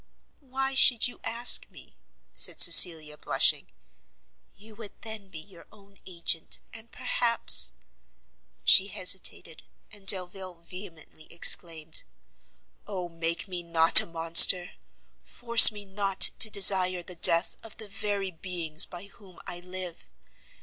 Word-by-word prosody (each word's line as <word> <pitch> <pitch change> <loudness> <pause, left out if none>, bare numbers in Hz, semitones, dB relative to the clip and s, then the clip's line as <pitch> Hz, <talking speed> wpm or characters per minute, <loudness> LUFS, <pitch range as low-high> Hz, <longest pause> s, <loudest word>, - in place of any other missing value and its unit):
"Why 270 -1 -6
should 245 -3 +3
you 245 - -14
ask 235 +2 +2
me?" - - -18 0.4
said - - +1
Cecilia, 155 -4 +4
blushing; - - +1 0.9
"you 215 +2 -19
would 220 -3 -15
then 220 -3 -11
be 170 - -14
your 170 +1 -17
own 200 -1 -25
agent, 170 -2 -5 0.2
and 225 +1 -14
perhaps 230 - -1 0.4
" - - -46
She 190 - +5
hesitated, 185 -4 -4 0.3
and 200 -2 -17
Delvile 185 -1 -3
vehemently 170 -2 -15
exclaimed, 165 -2 0 0.8
"Oh 185 -4 -8
make 165 +2 -6
me 180 -2 -8
not 165 -1 +3
a - - -11
monster! 170 +2 +3 0.5
force 235 -1 +5
me 205 -1 -13
not 195 0 0
to 220 - +3
desire 185 -3 +1
the 180 - -10
death 170 0 0
of 225 -2 -13
the 220 - -12
very 200 -2 -6
beings 165 -3 -3
by 175 0 -12
whom 195 -3 -21
I 175 - -9
live! 180 - -12
185 Hz, 130 wpm, -24 LUFS, 170-205 Hz, 0.9 s, She